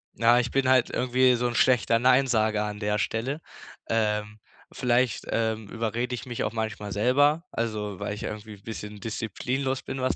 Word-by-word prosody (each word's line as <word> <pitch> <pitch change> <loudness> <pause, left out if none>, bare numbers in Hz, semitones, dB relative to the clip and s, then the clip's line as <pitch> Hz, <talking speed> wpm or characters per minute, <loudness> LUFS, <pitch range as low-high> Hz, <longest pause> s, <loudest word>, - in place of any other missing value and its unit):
Na, 120 +1 +5
ich 120 - -4
bin 135 -1 +1
halt 130 -2 +4
irgendwie 125 0 +3
so 120 +1 0
'n 120 - -3
schlechter 115 -2 +4
Nein-Sager 115 -4 +3
an 105 0 -5
der 105 0 0
Stelle. 130 +9 -2 0.5
Ähm, 105 -1 -1 0.3
vielleicht, 125 -1 +1
ähm, 110 -2 -1
überrede 115 +2 -2
ich 120 - -5
mich 120 -2 -3
auch - - -1
manchmal 110 -2 -4
selber, 140 - +3
also, 105 -4 -3
weil - - -3
ich 105 - -7
irgendwie 105 0 -6
n' 100 - -19
bisschen 105 -2 -7
disziplinlos 125 +5 -3
bin, 135 - -5
was 130 - +1
115 Hz, 175 wpm, -26 LUFS, 105-125 Hz, 0.5 s, Na